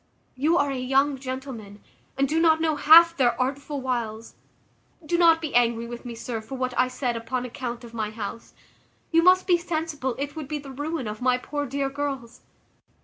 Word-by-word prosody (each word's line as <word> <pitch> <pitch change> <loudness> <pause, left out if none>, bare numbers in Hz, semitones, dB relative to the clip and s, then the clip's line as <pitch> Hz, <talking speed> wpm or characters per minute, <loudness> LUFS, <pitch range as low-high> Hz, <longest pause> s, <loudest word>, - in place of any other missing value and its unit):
You 305 +6 +2
are 285 0 +1
a 265 - -3
young 270 +2 +1
gentleman, 255 -6 -7 0.4
and 275 0 +2
do 315 +4 0
not 320 -1 +4
know 320 -1 +1
half 335 +3 +7
their 240 -5 +2
artful 275 +2 -2
wiles. 230 -3 -3 0.7
Do 345 - 0
not 335 -1 +5
be 310 -4 -4
angry 235 -1 +2
with 240 +1 -8
me, 240 -1 -6
sir, 230 0 -5
for 245 +5 -8
what 255 -1 -2
I 255 - +3
said 255 -1 -2
upon 230 +2 -3
account 245 -1 -6
of 235 -1 -11
my 220 -2 -2
house; 220 +1 -7 0.6
you 330 0 +5
must 365 +2 +5
be 355 -2 +3
sensible 315 -7 -3
it 285 +2 -4
would 310 -4 -6
be 300 +1 -3
the 280 -2 -9
ruin 290 +1 -4
of 215 +2 -6
my 250 0 +3
poor 290 +3 -4
dear 275 +2 -1
girls. 270 -4 -5
265 Hz, 200 wpm, -25 LUFS, 240-300 Hz, 0.7 s, half